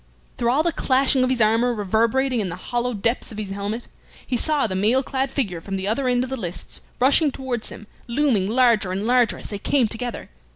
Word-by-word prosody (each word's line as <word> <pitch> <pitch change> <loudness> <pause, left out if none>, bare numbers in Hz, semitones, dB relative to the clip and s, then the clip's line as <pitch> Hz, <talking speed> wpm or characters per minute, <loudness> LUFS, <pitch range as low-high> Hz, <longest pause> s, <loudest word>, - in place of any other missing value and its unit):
Through 235 - 0
all 280 +6 +3
the 340 - +1
clashing 265 -2 +2
of 255 - +1
his 255 -2 0
armor 230 +3 +3
reverberating 230 +5 +1
in 200 -4 -1
the 175 - -4
hollow 240 +5 -2
depths 230 +5 -1
of 215 - -9
his 205 -2 -5
helmet, 205 +4 -4 0.4
he 255 - -2
saw 295 +4 +1
the 200 - -2
mail 225 +8 +2
clad 265 0 -2
figure 195 - -2
from 195 +3 -5
the 190 0 -3
other 255 +5 0
end 245 0 +2
of 260 - -6
the 265 - -2
lists 175 -1 -6 0.2
rushing 280 +3 +4
towards 255 -4 -3
him, 215 - -10 0.2
looming 235 -6 +1
larger 230 -5 +3
and 195 +3 -2
larger 245 0 +3
as - - -9
they 205 - -4
came 255 +2 +2
together. 235 - -5
235 Hz, 220 wpm, -22 LUFS, 210-260 Hz, 0.4 s, rushing